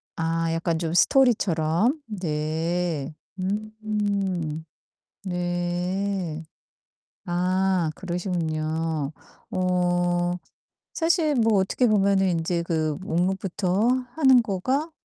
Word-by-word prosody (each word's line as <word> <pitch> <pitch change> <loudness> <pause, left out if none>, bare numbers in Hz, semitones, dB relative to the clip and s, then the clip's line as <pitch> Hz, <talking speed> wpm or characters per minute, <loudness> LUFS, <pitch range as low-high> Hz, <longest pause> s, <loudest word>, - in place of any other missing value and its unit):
아 165 0 0
약간 165 0 -1
좀 165 -1 -2
스토리처럼. 210 - +3
네. 160 -3 -2 0.3
음. 200 -5 -2 0.6
네. 175 -1 -2 0.8
아 180 -1 +1
그러시군요. 160 -4 -2 0.4
어 175 -1 +1 0.6
사실 325 -3 +2
뭐 225 -3 +3
어떻게 215 +6 +1
보면은 195 -2 +3
인제 170 +1 0
그 155 -3 0
목록부터 190 +2 0 0.3
하는 265 -5 +6
거가 255 - -1
180 Hz, 155 characters per minute, -25 LUFS, 165-200 Hz, 0.8 s, 하는